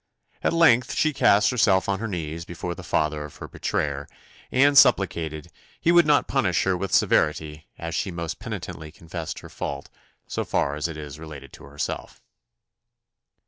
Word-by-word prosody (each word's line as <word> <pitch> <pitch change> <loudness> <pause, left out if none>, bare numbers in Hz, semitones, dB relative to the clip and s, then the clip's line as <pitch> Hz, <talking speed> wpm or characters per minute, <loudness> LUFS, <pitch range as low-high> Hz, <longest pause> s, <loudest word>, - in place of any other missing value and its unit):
At - - +1
length 125 -8 +4
she 155 -1 +2
cast 100 -5 +4
herself 100 -6 +3
on 95 -1 0
her 115 - -3
knees 85 -4 -4
before 85 +1 -5
the - - -9
father 75 -1 -1
of 75 - -10
her - - -8
betrayer, 70 -1 -2 0.4
and 140 +2 +4
supplicated 80 - +3 0.3
"he 170 - +3
would 175 -2 +6
not 145 -1 +4
punish 100 - +1
her 95 -1 +1
with 95 +1 -4
severity, 75 0 +1
as 85 0 -5
she 105 +4 -1
most 85 -2 -5
penitently 90 -7 -7
confessed 85 0 -7
her - - -11
fault, - - -5 0.4
so - - -3
far 70 - 0
as 75 +2 -2
is 75 -2 -8
related 75 -4 -10
to - - -12
herself." 75 +1 -5
85 Hz, 165 wpm, -24 LUFS, 75-105 Hz, 0.4 s, would